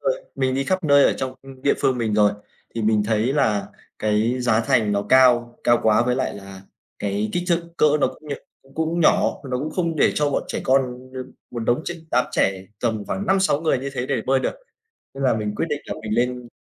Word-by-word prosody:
nơi - - 0
mình 130 -1 0
đi 135 - 0
khắp 185 +2 -1
nơi 140 -1 +6
ở - - +4
trong 130 -1 -4 0.3
địa 140 - +3
phương 130 -2 +1
mình 110 -2 0
rồi 105 -1 +4 0.4
thì 115 - -2
mình 105 -1 +3
thấy 110 +3 +1
là 110 -8 +1 0.3
cái 110 +4 +1
giá 115 -2 +2
thành 115 -5 +2
nó 100 0 0
cao, 120 -2 +4
cao 120 0 +4
quá 110 +1 +4
với 125 - +2
lại 130 - -1
là 95 -1 -10 0.4
cái 105 +1 -1
kích 175 - 0
thước, 170 0 +2
cỡ - - +3 0.2
nó - - +4
cũng 155 - -10
nh - - -2 0.3
cũng 135 0 -22
cũng 160 +2 -1
nhỏ, 160 - +3
nó 125 - -1
cũng 155 +3 -3
không 170 -2 -1
để - - +3
cho 145 -1 +1
bọn - - 0
trẻ - - -3
con 130 -1 0
đ - - -10 0.3
một 120 - -6
đống 120 +6 0
tr 175 - -3 0.2
đám 125 - +3
trẻ 95 -1 0
tầm 110 -4 -1
khoảng 200 - -3
5-6 190 -6 +2
người 155 -5 +1
như 140 +1 -5
thế 125 -1 -2
để 135 -4 0
bơi 135 0 +3
được. - - -2 0.6
Nên 135 0 -5
là 130 - +4
mình 105 -1 -3
quyết - - -1
định 150 -1 -1
là - - -4
mình 105 - -3
lên 120 +1 +3
trên 125 -1 -7
125 Hz, 240 wpm, -22 LUFS, 110-145 Hz, 0.6 s, nơi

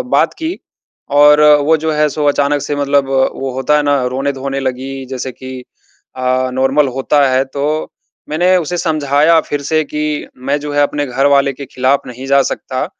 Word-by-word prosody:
बात - - +2
की 325 +3 -3 0.6
और 150 +1 +6 0.2
वो 160 - +4
जो 160 +1 -2
है, 150 0 +2
सो 150 +1 -3
अचानक 145 0 +1
से 145 - -3
मतलब 140 -1 +1
वो 135 0 0
होता 135 +3 +1
है 150 - +1
ना, 145 -3 +1
रोने-धोने 135 +1 -3
लगी, 135 +1 -4
जैसे 130 0 -5
कि 130 0 -9 0.5
अ, 130 0 0
नॉर्मल 135 +2 +2
होता 140 +1 +2
है, 130 +1 +2
तो 145 +3 -3 0.4
मैंने 175 +5 +2
उसे 175 0 -3
समझाया 155 -1 +2
फिर 145 -2 -4
से 155 +2 +1
कि, 150 0 -3
"मैं 140 +3 -2
जो 145 0 -6
है, 145 - +2
अपने 145 0 -1
घर 135 +2 -1
वाले 140 0 +3
के 140 +1 -9
ख़िलाफ़ 130 +2 0
नहीं 125 +2 -8
जा 140 0 +4
सकता। 130 +1 -3
140 Hz, 185 wpm, -15 LUFS, 130-150 Hz, 0.6 s, और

